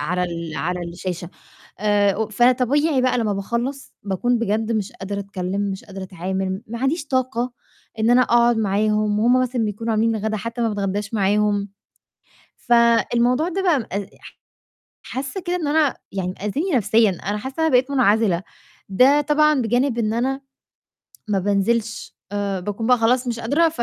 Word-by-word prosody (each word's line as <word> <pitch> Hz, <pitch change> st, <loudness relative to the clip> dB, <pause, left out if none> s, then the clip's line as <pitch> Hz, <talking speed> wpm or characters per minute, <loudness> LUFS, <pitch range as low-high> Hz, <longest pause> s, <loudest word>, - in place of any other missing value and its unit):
على 180 Hz, +1 st, -1 dB
ال 170 Hz, -3 st, -5 dB
على 180 Hz, +2 st, -2 dB
الشاشة 175 Hz, 0 st, -5 dB, 0.5 s
آآ، 205 Hz, +1 st, +2 dB
فطبيعي 255 Hz, +5 st, +2 dB
بقى 255 Hz, -1 st, +2 dB
لمّا 220 Hz, -3 st, 0 dB
باخلّص 235 Hz, +7 st, -4 dB
باكون 205 Hz, +5 st, 0 dB
بجد 220 Hz, 0 st, -1 dB
مش 215 Hz, +1 st, -2 dB
قادرة 200 Hz, -3 st, -5 dB
أتكلّم، 195 Hz, -1 st, -4 dB
مش 190 Hz, 0 st, -6 dB
قادرة 195 Hz, -1 st, -8 dB
أتعامل، 190 Hz, +2 st, -3 dB
ما 235 Hz, +2 st, -6 dB
عنديش 290 Hz, +3 st, 0 dB
طاقة 255 Hz, -2 st, -1 dB, 0.5 s
إن 220 Hz, +1 st, +2 dB
أنا 250 Hz, +1 st, +6 dB
أقعد 240 Hz, -1 st, +3 dB
معاهم 210 Hz, 0 st, +1 dB
وهُم 245 Hz, +4 st, +4 dB
مثلًا 250 Hz, -2 st, -1 dB
بيكونوا 220 Hz, +2 st, -2 dB
عاملين 225 Hz, +1 st, +1 dB
الغدا 215 Hz, +1 st, -2 dB
حتى 230 Hz, +3 st, -5 dB
ما 230 Hz, -, +2 dB
باتغدّاش 205 Hz, 0 st, -3 dB
معاهم، 205 Hz, 0 st, +1 dB, 0.9 s
فالموضوع 240 Hz, +4 st, +3 dB
ده 385 Hz, +2 st, -2 dB
بقى 345 Hz, -7 st, +3 dB
مأ 225 Hz, -, -5 dB, 0.4 s
ح -, -, -15 dB, 0.6 s
حاسّة 270 Hz, +9 st, -5 dB
كده 350 Hz, +1 st, -2 dB
إن 335 Hz, -4 st, -2 dB
أنا 300 Hz, -2 st, +2 dB, 0.2 s
يعني 185 Hz, -2 st, -3 dB
آذيني 300 Hz, -, -1 dB
نَفْسيًا، 220 Hz, -1 st, +3 dB
أنا 200 Hz, +3 st, -4 dB
حاسّة 265 Hz, +5 st, -7 dB
إن -, -, +2 dB
أنا 320 Hz, -, +3 dB
بقيت 255 Hz, +2 st, +3 dB
منعزلة، 215 Hz, -8 st, +2 dB, 0.5 s
ده 260 Hz, +9 st, +5 dB
طبعًا 300 Hz, -1 st, +3 dB
بجانب 245 Hz, +2 st, +1 dB
إن 220 Hz, -2 st, 0 dB
أنا 265 Hz, +4 st, -1 dB, 0.9 s
ما 205 Hz, -2 st, +1 dB
بانزلش 210 Hz, +4 st, -1 dB, 0.2 s
آآ، 200 Hz, -2 st, -2 dB
باكون 205 Hz, +4 st, -4 dB
بقى 250 Hz, 0 st, +5 dB
خلاص 245 Hz, +3 st, +2 dB
مش 235 Hz, -1 st, -2 dB
قادرة، 295 Hz, +9 st, +2 dB
225 Hz, 160 wpm, -21 LUFS, 200-255 Hz, 0.9 s, أنا